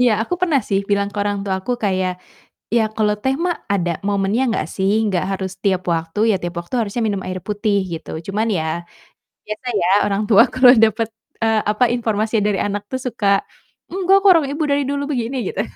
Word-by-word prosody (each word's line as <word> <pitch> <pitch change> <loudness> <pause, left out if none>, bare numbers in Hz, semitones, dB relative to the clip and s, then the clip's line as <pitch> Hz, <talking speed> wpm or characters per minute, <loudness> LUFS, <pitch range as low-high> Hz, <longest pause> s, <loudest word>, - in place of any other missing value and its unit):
Iya 250 -1 +5
aku 360 - -2
pernah 320 -7 +2
sih 195 -2 +2
bilang 200 0 +2
ke - - -13
orang 205 0 -1
tuaku 190 +4 -2
kayak, 185 -2 +1 0.6
"Ya 235 - +5
kalau 210 -1 +2
teh 265 0 +1
mah 350 - 0 0.2
ada 175 -3 0 0.2
momennya 200 +3 +1
nggak 160 - -1
sih? 190 +1 +1 0.2
Nggak 190 -4 0
harus 190 -1 -3
tiap 190 -2 +2
waktu, 165 +4 -3
ya - - +2
tiap 175 0 -5
waktu 170 +8 -6
harusnya 225 +2 -2
minum 200 -2 -2
air 185 0 -4
putih." 205 0 0 0.2
Gitu. 160 - -7 0.2
Cuman 215 +3 -1
ya, 160 - -1 0.8
biasa 215 +4 -6
ya 175 - +1 0.2
orang 200 0 0
tua 220 +2 +8
kalau 255 -1 +7
dapet, 225 0 +2 0.4
eee, 220 -1 +2
apa, 210 +4 +1
informasinya 220 -2 0
dari 200 -2 0
anak 205 0 -3
tuh 260 - -2
suka, 230 -4 -2 0.6
"Enggak 380 +1 +3
kok, 400 - +6
orang 330 -5 +4
ibu 305 +2 -2
dari 285 0 +2
dulu 285 0 -1
begini." 245 0 -2
Gitu. 200 - -2
210 Hz, 200 wpm, -19 LUFS, 195-245 Hz, 0.8 s, tua